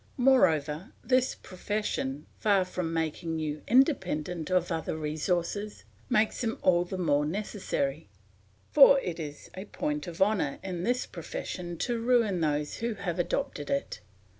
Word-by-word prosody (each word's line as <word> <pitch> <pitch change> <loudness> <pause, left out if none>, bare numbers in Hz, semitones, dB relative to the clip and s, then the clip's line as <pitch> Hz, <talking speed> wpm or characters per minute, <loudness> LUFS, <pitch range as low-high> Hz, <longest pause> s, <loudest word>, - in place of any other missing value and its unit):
Moreover, 175 - +3
this 255 0 +2
profession, 180 -8 -3
far 200 -3 +3
from 180 -2 -3
making 165 0 -2
you 155 -1 -3
independent 180 - +2
of 180 -1 +1
other 160 -1 -2
resources, 170 - -2 0.3
makes 215 +1 +2
them 225 -2 -1
all 175 -1 +4
the 185 +1 -5
more 150 -5 +2
necessary; 155 - -2 0.6
for 275 -1 +8
it 175 -6 -4
is 150 -2 -7
a 190 +2 -6
point 150 -6 -3
of 170 -1 -7
honour 190 -8 +2
in 180 -3 -4
this 245 +4 0
profession 180 - -6
to 235 +4 -1
ruin 230 -7 +2
those 150 -1 0
who 230 -1 -2
have 180 -3 -3
adopted 145 -3 -2
it. 140 -5 -2
180 Hz, 140 wpm, -29 LUFS, 155-210 Hz, 0.6 s, for